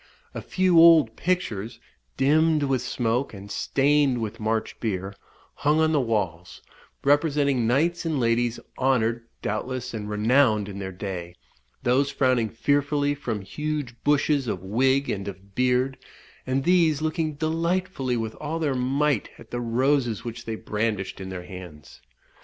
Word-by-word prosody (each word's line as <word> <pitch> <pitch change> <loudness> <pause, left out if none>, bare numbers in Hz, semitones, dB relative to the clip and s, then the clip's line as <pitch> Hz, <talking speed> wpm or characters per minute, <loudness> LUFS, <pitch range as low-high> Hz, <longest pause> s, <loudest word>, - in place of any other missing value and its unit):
A - - -5
few 185 -3 +3
old 160 -9 +7
pictures, 115 - -2 0.4
dimmed 155 +2 +3
with 135 -3 +1
smoke, 125 -1 -1
and 100 +1 -10
stained 140 -2 +2
with 115 +1 -4
March 110 0 -2
beer, 95 -3 -3 0.4
hung 150 +2 +2
on 160 0 +3
the 150 -3 +3
walls, 95 -8 -3 0.4
representing 140 -4 +2
knights 165 +8 +1
and 160 -4 -1
ladies, 115 0 +1 0.2
honoured, 120 -3 +1 0.2
doubtless, 125 +4 -3
and 105 -2 -5
renowned 110 0 +3
in 100 -1 -7
their 95 -1 -5
day; 90 -2 -6 0.5
those 135 +3 +2
frowning 130 -5 +1
fearfully 145 +4 +1
from 120 -7 -4
huge 150 +4 -4
bushes 145 -2 +2
of 95 -4 -3
wig 130 +7 +2
and 100 -1 -3
of 100 0 -9
beard; 125 +3 +1 0.5
and 130 +1 0
these 165 -3 +3
looking 155 -1 -1
delightfully 165 -4 -1
with 110 -1 -3
all 150 +2 -3
their 155 -4 0
might 135 0 0
at - - -15
the 120 - -3
roses 120 -1 +1
which 115 0 -6
they 115 - -3
brandished 105 -3 -3
in 95 - -6
their 90 -1 -6
hands. 85 -8 -11
125 Hz, 145 wpm, -25 LUFS, 110-145 Hz, 0.5 s, old